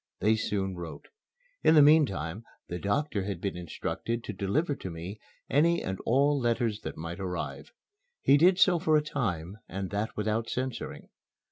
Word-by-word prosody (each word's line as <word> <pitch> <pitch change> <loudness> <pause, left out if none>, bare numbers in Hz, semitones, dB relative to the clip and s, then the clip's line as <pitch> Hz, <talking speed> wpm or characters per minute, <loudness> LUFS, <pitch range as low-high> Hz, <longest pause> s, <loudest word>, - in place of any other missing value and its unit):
They 110 +3 +3
soon 100 -3 -1
wrote. 85 -2 -8 0.5
In 160 - +6
the 150 - +9
meantime 110 - +3 0.3
the 90 - -3
doctor 115 - 0
had 100 -1 -3
been 100 - -3
instructed 100 +7 -4
to 105 - -5
deliver 120 - 0
to 95 - -6
me 85 +5 -7 0.3
any 170 +4 +3
and 95 0 -3
all 140 +4 +3
letters 115 -3 0
that - - -6
might 85 +3 -6
arrive. 90 -2 -4 0.5
He 140 - +5
did 180 +5 +5
so 180 -2 +5
for 155 -1 +3
a 150 - +1
time, 100 - -3
and 95 +1 -4
that 105 +2 -2
without 110 +2 -1
censoring. 130 -1 -4
110 Hz, 165 wpm, -29 LUFS, 95-145 Hz, 0.5 s, the